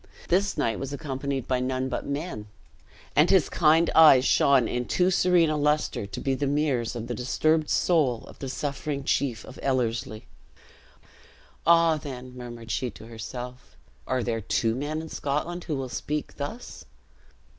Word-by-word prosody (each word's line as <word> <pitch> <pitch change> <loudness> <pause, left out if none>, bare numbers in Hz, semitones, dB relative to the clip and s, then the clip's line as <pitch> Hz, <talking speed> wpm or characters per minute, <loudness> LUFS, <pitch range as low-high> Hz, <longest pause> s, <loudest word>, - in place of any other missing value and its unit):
This 195 +3 +1
knight 115 -2 0
was 135 0 -5
accompanied 140 -3 -4
by 130 -1 +1
none 130 +1 -1
but 130 - -4
men; 140 -7 -4 0.7
and 150 +4 +5
his 190 -6 +4
kind 165 0 +4
eyes 140 -5 +7
shone 135 -5 +4
in 125 0 -2
too 180 +7 +2
serene 175 -3 +3
a - - 0
luster 150 -7 0
to 100 - -6
be 135 - 0
the 140 +2 -1
mirrors 135 -5 0
of 115 -1 -4
the 120 - -4
disturbed 155 +6 +1
soul 145 -10 +2
of - - -14
the 135 - -5
suffering 140 +1 -3
chief 130 -5 -1
of 130 - -12
Ellerslie. 115 -4 -1 1.4
"Ah! 165 -1 +5
then," 130 -4 -8
murmured 120 -2 -8
she 125 +4 -1
to 110 - -12
herself, 125 +2 -8 0.3
"are 130 -1 0
there 115 -1 -2
two 110 +2 0
men 150 +5 -3
in 160 - -9
Scotland 155 +6 -3
who 155 - -2
will 135 -1 -3
speak 150 +5 -4
thus?" 185 +13 -6
135 Hz, 165 wpm, -26 LUFS, 125-155 Hz, 1.4 s, eyes